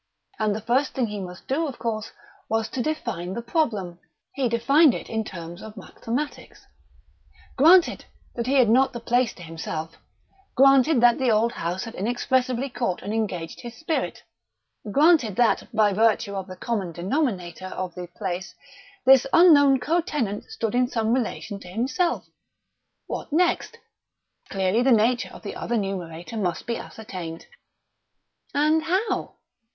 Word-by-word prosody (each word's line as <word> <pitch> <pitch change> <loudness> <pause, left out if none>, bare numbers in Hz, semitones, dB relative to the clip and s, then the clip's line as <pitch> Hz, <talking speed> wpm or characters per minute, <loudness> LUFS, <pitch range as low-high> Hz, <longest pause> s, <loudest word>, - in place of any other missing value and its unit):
And 215 -2 +1
the 215 - -4
first 250 +5 +1
thing 255 - +1
he 210 -2 -5
must 180 -1 -9
do, 310 +5 0
of 270 - -7
course, 220 -2 -3 0.4
was 225 0 0
to 255 - -3
define 190 - -3
the 235 - -3
problem. 215 - -1 0.3
He 265 -3 0
defined 275 +5 +4
it - - -7
in 220 -1 -1
terms 170 -4 -8
of 220 0 -10
mathematics. 245 +8 -6 0.9
Granted 335 +6 +5 0.3
that 235 0 -3
he 275 - +2
had 255 -4 +5
not 255 +5 +4
the 240 - -5
place 240 0 +1
to 175 - -11
himself; 160 0 -6 0.6
granted 270 +1 +5
that 240 -1 +5
the 260 -2 +2
old 225 +1 +3
house 175 0 -3
had 230 -1 -7
inexpressibly 245 +4 0
caught 235 -8 -3
and 205 - -4
engaged 180 -7 -3
his 240 -1 -8
spirit; 320 +5 -3 0.7
granted 290 - +4
that, 240 0 +2
by 215 -2 +3
virtue 215 0 +2
of 195 -1 -4
the 185 - -8
common 195 -3 -3
denominator 185 - -2
of 185 -1 -5
the 180 0 -7
place, 180 0 -5 0.5
this 265 0 +7
unknown 285 -6 +6
co 320 +8 +1
tenant 245 - -3
stood 445 - -4
in 250 0 +3
some 225 -2 0
relation 220 -4 -2
to 180 - -13
himself: 260 - -1 0.8
what - - -6
next? 345 +3 +1 0.7
Clearly, 195 +3 +1
the 260 +1 +3
nature 235 +2 +3
of - - -12
the 205 - -6
other 235 - -2
numerator 185 0 -4
must 180 -5 -2
be 235 - -2
ascertained. 180 -7 -8 1.1
And 305 +2 +3
how? 370 +7 -1
230 Hz, 155 wpm, -24 LUFS, 195-265 Hz, 1.1 s, this